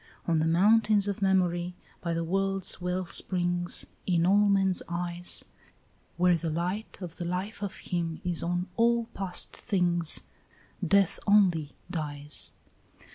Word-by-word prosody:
"On 165 Hz, -2 st, +2 dB
the 160 Hz, -, +1 dB
mountains 205 Hz, +4 st, +4 dB
of 200 Hz, +1 st, -3 dB
memory, 180 Hz, -2 st, +1 dB, 0.3 s
by 170 Hz, -1 st, -2 dB
the 165 Hz, -, -1 dB
world's 195 Hz, +1 st, -1 dB
wellsprings, 175 Hz, 0 st, -1 dB, 0.2 s
In 170 Hz, -2 st, +2 dB
all 205 Hz, +2 st, +4 dB
men's 195 Hz, -2 st, +3 dB
eyes, 175 Hz, 0 st, +1 dB, 0.7 s
Where 180 Hz, 0 st, +4 dB
the 165 Hz, 0 st, -3 dB
light 180 Hz, +7 st, -3 dB
of 175 Hz, -2 st, -8 dB
the 175 Hz, -, -4 dB
life 185 Hz, +5 st, -4 dB
of 200 Hz, -2 st, -4 dB
him 165 Hz, -2 st, -3 dB
is 175 Hz, -2 st, +2 dB
on 175 Hz, +1 st, -1 dB
all 235 Hz, 0 st, +3 dB
past 190 Hz, -2 st, 0 dB
things, 175 Hz, -4 st, 0 dB, 0.6 s
Death 195 Hz, +1 st, +3 dB
only 180 Hz, -8 st, +3 dB, 0.2 s
dies. 150 Hz, -2 st, -2 dB
180 Hz, 130 wpm, -28 LUFS, 170-195 Hz, 0.7 s, mountains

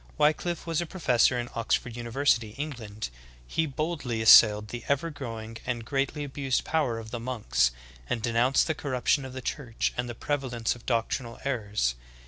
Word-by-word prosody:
Wickllffe 155 Hz, +3 st, +1 dB
was 165 Hz, -1 st, 0 dB
a 170 Hz, -, -4 dB
professor 125 Hz, -8 st, +3 dB
in 120 Hz, 0 st, -2 dB
Oxford 115 Hz, +1 st, -1 dB
university, 120 Hz, -2 st, +1 dB
England. 110 Hz, -, -5 dB, 0.3 s
He 160 Hz, -, 0 dB
boldly 140 Hz, -6 st, -2 dB
as 110 Hz, -, +6 dB
sailed 105 Hz, -1 st, +8 dB
the 120 Hz, 0 st, -6 dB
ever 140 Hz, +4 st, 0 dB
growing 115 Hz, -5 st, -6 dB
and 120 Hz, -2 st, -3 dB
greatly 140 Hz, +3 st, -1 dB
abused 135 Hz, -2 st, -1 dB
power 145 Hz, -8 st, 0 dB
of 110 Hz, -1 st, -8 dB
the 120 Hz, -, -3 dB
monks, 110 Hz, -, +1 dB, 0.4 s
and 120 Hz, -, 0 dB
denounced 120 Hz, +3 st, +3 dB
the 160 Hz, -, 0 dB
corruption 140 Hz, -2 st, 0 dB
of 130 Hz, -, -8 dB
the 130 Hz, -1 st, -6 dB
Church 120 Hz, -5 st, -2 dB
and 125 Hz, 0 st, -2 dB
the 120 Hz, -, -5 dB
prevalence 130 Hz, -5 st, -1 dB
of 120 Hz, -, -16 dB
doctrinal 115 Hz, 0 st, -1 dB
errors. 105 Hz, -, 0 dB
125 Hz, 170 wpm, -28 LUFS, 115-140 Hz, 0.4 s, sailed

